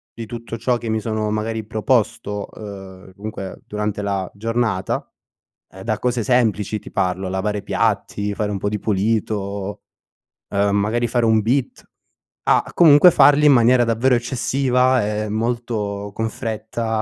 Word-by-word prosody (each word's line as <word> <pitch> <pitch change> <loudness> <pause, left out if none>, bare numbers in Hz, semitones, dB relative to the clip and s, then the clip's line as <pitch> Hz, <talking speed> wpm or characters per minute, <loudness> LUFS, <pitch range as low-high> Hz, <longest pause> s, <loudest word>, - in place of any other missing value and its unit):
di 115 - -6
tutto 115 +1 -7
ciò 125 +2 0
che 115 -1 -6
mi 110 0 0
sono 110 -1 -2
magari 110 +1 -2
proposto, 110 -2 -1
ehm, 95 -3 -10
dunque 100 -2 -7
durante 105 -1 -3
la 100 -2 -2
giornata, 115 -2 -2 0.6
ehm 95 - -11
da 110 0 -1
cose 125 -1 0
semplici, 110 -3 +1
ti - - -12
parlo 95 +1 -1
lavare 100 +2 -2
piatti, 105 0 -1
fare 105 0 -2
un 100 - -2
po' 100 +1 -2
di 105 - -2
pulito, 100 -1 -2 0.7
ehm 100 0 +1
magari 115 +4 0
fare 120 0 +1
un 110 -1 +4
beat, 125 +4 -1 0.6
a - - +2
comunque 165 +1 +7
farli 145 +1 +5
in 150 - +8
maniera 120 0 +5
davvero 120 +3 +2
eccessiva, 125 0 +1 0.2
e 105 - -5
molto 110 -3 -2
con 110 +1 -2
fretta 110 0 -3
110 Hz, 150 wpm, -20 LUFS, 100-120 Hz, 0.7 s, in